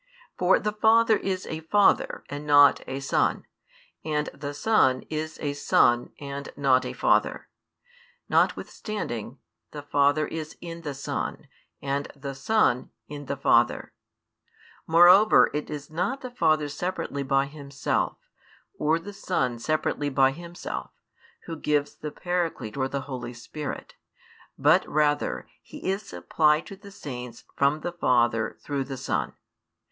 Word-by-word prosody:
For 180 +1 +4
the 210 - -2
Father 220 +1 +4
is 190 -2 -3
a 160 - -5
Father 195 +6 +2
and 145 +1 -6
not 145 -1 +6
a 135 +1 -4
Son, 135 - 0 0.6
and 150 -1 -1
the 145 0 -6
Son 140 -10 +3
is 155 0 -4
a 145 -2 -2
Son 120 -3 +2
and 140 -1 -6
not 130 -2 +3
a - - -5
Father; - - +1 0.8
notwithstanding, 125 - -1 0.3
the 145 -1 -8
Father 145 +1 +2
is 155 -1 -6
in 170 -1 -8
the 145 -4 -5
Son, 140 - -4 0.4
and 140 +1 -2
the 140 0 -6
Son 135 - +1 0.2
in 145 -1 -8
the - - -3
Father; - - +2 0.9
moreover, 175 +6 +7
it 150 0 -3
is 150 0 -7
not 255 +12 -2
the 255 - -7
Father 155 -10 +2
separately 160 -2 -3
by 135 0 +2
Himself, 140 -1 -2 0.6
or 155 +2 +2
the 200 +5 -9
Son 130 -11 -1
separately 145 +1 -1
by 135 -1 +4
Himself, 170 +4 -7 0.6
Who 165 - -5
gives 150 -2 0
the 150 - -6
Paraclete 170 -10 -3
or 130 -1 0
the 140 +1 -3
Holy 130 -3 -6
Spirit, 145 +5 -7 0.6
but - - +4
rather 150 0 0
He - - -9
is 195 +2 0
supplied 155 -5 +1
to 195 - -9
the 200 +1 -14
saints 125 - -8
from 140 +2 +2
the 175 - -3
Father 120 -8 +1
through 140 -2 -2
the 135 -1 -6
Son. - - -2
150 Hz, 140 wpm, -26 LUFS, 140-170 Hz, 0.9 s, moreover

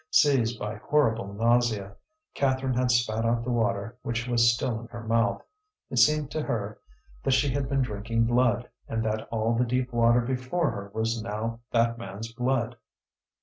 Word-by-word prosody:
Seized 120 -7 +3
by 105 +1 -4
horrible 115 -5 +1
nausea, 115 -2 +1 0.4
Catherine 130 -1 0
had 125 0 +1
spat 115 -2 +2
out 115 0 +1
the 125 - -2
water 115 0 -1
which 120 +1 -3
was 120 -1 +4
still 115 -1 -2
in 115 - -10
her 120 0 -8
mouth. 115 +1 +1 0.5
It 125 - -3
seemed 150 +3 +4
to 155 - -2
her 105 -6 -3 0.4
that 135 - +1
she 135 +2 +2
had 135 0 -2
been 135 -1 +2
drinking 115 0 -1
blood, 120 0 +2 0.2
and 115 0 -2
that 110 0 -2
all 115 0 0
the 120 +2 +2
deep 125 +1 -1
water 120 +1 +4
before 130 +7 -1
her 100 0 -7
was 115 +1 -1
now 115 +2 -4
that 115 0 +1
man's 110 +2 -7
blood. 125 -1 -1
115 Hz, 175 wpm, -27 LUFS, 110-125 Hz, 0.5 s, was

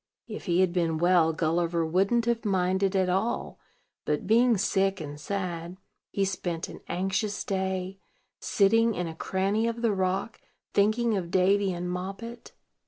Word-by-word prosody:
If 215 - -7
he 175 -1 +2
had 185 -2 +2
been 165 -3 +1
well, 175 -1 +4
Gulliver 165 +1 0
wouldn't 195 +8 +2
have 235 -1 0
minded 190 -1 +1
at 190 -1 +2
all; 195 +6 -1 0.4
but, 150 -1 -1
being 230 +2 +4
sick 195 0 +1
and 145 -2 -7
sad, 175 0 -4 0.3
he 195 - 0
spent 175 -3 -3
an - - -9
anxious 195 +3 -1
day, 190 0 -2 0.4
sitting 225 +2 +3
in 180 - -2
a 165 - -5
cranny 195 +6 0
of 230 0 -3
the 225 -3 +3
rock, 190 +3 -2 0.3
thinking 215 +3 +2
of 180 -3 -3
Davy 190 +2 +3
and 175 0 -4
Moppet. 195 +6 -6
190 Hz, 155 wpm, -27 LUFS, 175-205 Hz, 0.4 s, well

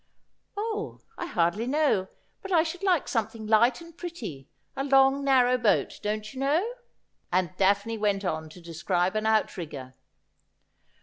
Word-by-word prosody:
' - - -43
Oh, 430 0 -4
I 345 - -5
hardly 180 - 0
know; 280 -9 +2 0.3
but 390 - -8
I 330 -3 +5
should 345 +2 -5
like 370 -6 +2
something 225 -1 -2
light 235 +5 +3
and 335 -1 -13
pretty, 230 - -7 0.3
a 270 - -2
long, 270 0 +4
narrow 255 -2 +4
boat, 220 -3 +1
don't 215 +1 -3
you 260 - -8
know*?' 300 +9 +2 0.6
and 180 0 0
Daphne 200 +3 +2
went 200 -2 0
on 160 -2 -2
to 175 +3 -13
describe 175 +3 -1
an 215 0 0
outrigger. 155 -11 -1
220 Hz, 150 wpm, -27 LUFS, 185-280 Hz, 0.6 s, I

